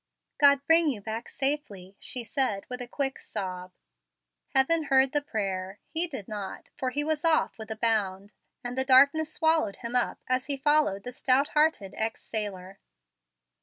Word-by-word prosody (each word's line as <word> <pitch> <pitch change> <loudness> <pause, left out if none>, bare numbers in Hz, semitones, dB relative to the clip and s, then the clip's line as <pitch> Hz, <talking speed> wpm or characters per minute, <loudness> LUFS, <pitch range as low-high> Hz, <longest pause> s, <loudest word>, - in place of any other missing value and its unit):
"God 280 -1 +5
bring 325 +1 +4
you 250 -7 -3
back 220 +3 -6
safely," 235 -10 -3
she 250 - -2
said, 225 -5 -1
with 250 0 -6
a 245 - -6
quick 270 +1 -2
sob. 185 -3 -6 0.8
Heaven 310 +4 +3
heard 265 -1 +4
the 295 -1 +1
prayer. 195 -6 -4
He 335 +2 +1
did 265 - -7
not, 205 -3 -7
for 260 - -2
he 290 +3 0
was 310 0 -1
off 325 -7 +2
with 220 - -8
a 220 - -3
bound; 205 -3 0 0.3
and 245 0 -4
the 260 - +2
darkness 280 +4 +5
swallowed 320 -11 +1
him 235 0 -6
up 245 - +1
as 255 0 0
he 280 -1 -1
followed 295 -9 +2
the 250 - -6
stout 260 +3 +2
hearted 300 -11 +1
ex 220 0 -2
sailor. 195 -3 -4
255 Hz, 170 wpm, -27 LUFS, 205-290 Hz, 0.8 s, God